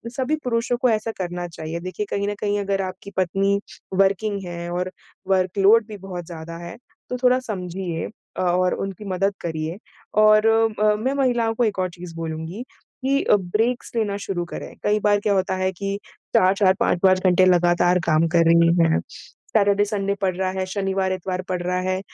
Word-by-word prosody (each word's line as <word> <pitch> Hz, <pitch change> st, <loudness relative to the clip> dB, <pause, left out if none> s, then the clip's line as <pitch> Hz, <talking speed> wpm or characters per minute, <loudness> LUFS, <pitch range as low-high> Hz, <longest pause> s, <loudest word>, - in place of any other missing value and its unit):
सभी 270 Hz, +3 st, 0 dB
पुरुषों 240 Hz, 0 st, 0 dB
को 250 Hz, -, +4 dB
ऐसा 220 Hz, 0 st, 0 dB
करना 175 Hz, -1 st, -4 dB
चाहिए, 165 Hz, 0 st, -6 dB
देखिए 185 Hz, +4 st, -4 dB
कहीं 200 Hz, 0 st, -1 dB
न 205 Hz, -, -3 dB
कहीं 205 Hz, 0 st, 0 dB
अगर 195 Hz, -1 st, -1 dB
आपकी 190 Hz, +2 st, -7 dB
पत्नी 195 Hz, +2 st, +1 dB, 0.3 s
वर्किंग 195 Hz, +1 st, +1 dB
है 170 Hz, 0 st, -6 dB
और 180 Hz, +1 st, -2 dB, 0.4 s
वर्क 185 Hz, 0 st, +1 dB
लोड 215 Hz, +3 st, +6 dB
भी 210 Hz, -2 st, -8 dB
बहुत 180 Hz, -3 st, -7 dB
ज़्यादा 165 Hz, 0 st, -8 dB
है, 170 Hz, -, -8 dB, 0.3 s
तो 250 Hz, -, -2 dB
थोड़ा 250 Hz, +1 st, +5 dB
समझिए 180 Hz, -7 st, -4 dB, 0.3 s
अ, -, -, -1 dB
और 180 Hz, 0 st, +2 dB
उनकी 195 Hz, +1 st, -5 dB
मदद 195 Hz, +2 st, +1 dB
करिए 160 Hz, +1 st, -3 dB, 0.5 s
और 215 Hz, 0 st, +6 dB
अ, 220 Hz, -1 st, +3 dB
मैं 255 Hz, +6 st, -1 dB
महिलाओं 240 Hz, -5 st, +1 dB
को 245 Hz, -, +1 dB
1 205 Hz, -3 st, -1 dB
और 185 Hz, -1 st, 0 dB
चीज 175 Hz, -1 st, -10 dB
बोलूँगी 165 Hz, +6 st, -5 dB, 0.4 s
कि 275 Hz, +1 st, +2 dB
ब्रेक्स 215 Hz, +5 st, +1 dB
लेना 210 Hz, -3 st, 0 dB
शुरू 195 Hz, -3 st, -3 dB
करें। -, -, -8 dB
कई 210 Hz, +1 st, +2 dB
बार 205 Hz, 0 st, +3 dB
क्या 205 Hz, -1 st, +1 dB
होता 190 Hz, -1 st, 0 dB
है 185 Hz, 0 st, 0 dB
कि 195 Hz, +2 st, -3 dB, 0.4 s
4-4 190 Hz, +1 st, +4 dB
5-5 185 Hz, +1 st, +3 dB
घंटे 185 Hz, +1 st, +5 dB
लगातार 175 Hz, 0 st, +4 dB
काम 160 Hz, 0 st, +3 dB
कर 170 Hz, -1 st, +5 dB
रही 170 Hz, 0 st, +5 dB
हैं। 165 Hz, -1 st, +3 dB, 0.4 s
सैटर्डे, 205 Hz, -1 st, +2 dB
संडे 200 Hz, -1 st, -1 dB
पड़ 185 Hz, -2 st, +1 dB
रहा 185 Hz, 0 st, 0 dB
है, 185 Hz, -, -1 dB
शनिवार-इतवार 190 Hz, -1 st, -2 dB
पड़ 180 Hz, -1 st, -1 dB
रहा 180 Hz, +1 st, -1 dB
है, 185 Hz, 0 st, -1 dB
190 Hz, 180 wpm, -22 LUFS, 175-210 Hz, 0.5 s, लोड